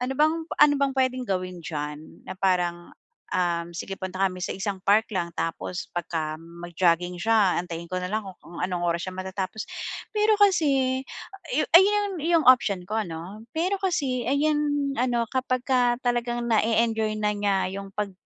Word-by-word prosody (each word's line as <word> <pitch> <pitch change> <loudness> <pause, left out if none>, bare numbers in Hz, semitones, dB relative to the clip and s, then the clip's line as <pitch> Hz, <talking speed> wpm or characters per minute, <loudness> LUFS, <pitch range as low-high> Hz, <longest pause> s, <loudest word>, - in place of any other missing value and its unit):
ano 260 - -2
bang 310 +3 +4 0.3
ano 295 -1 +7
bang 275 -1 +2
puwedeng 255 -1 0
gawin 185 -2 -2
diyan, 150 0 -6
na 185 - -6
parang, 175 -2 0 0.4
ah, 170 -2 +1
sige 195 +3 -5
punta 190 0 -6
kami 185 -1 -1
sa - - -2
isang 195 0 -3
park 215 +3 +4
lang 170 -3 -2
tapos 170 +2 -3
pagka 155 -3 -2
mag-jogging 170 +1 -1
siya 215 -1 +3
antayin 170 -1 -7
ko 185 - -3
na 180 - -3
lang 220 0 0 0.2
kung 170 - -9
anong 180 -1 -1
oras 170 0 0
siya 185 - -7
matatapos, 190 +2 -4 0.5
pero 425 0 +3
kasi 275 -10 +3 0.8
ay, - - +10
'yun 405 -3 +1
'yung 330 0 +2
option 200 -8 +5
ko 220 +1 0
ano, 175 +2 -7 0.2
pero 365 +5 +1
kasi 275 - 0
ay 280 +2 +2
'yan 300 -1 +2 0.4
ano 240 -2 +1
kapagka 255 -1 +1
talagang 240 0 0
na-e-enjoy 225 -1 +2
na 210 0 +1
niya 205 -1 +1 0.2
'yung 195 - -9
pag 205 -2 -2
210 Hz, 165 wpm, -25 LUFS, 180-255 Hz, 0.8 s, ay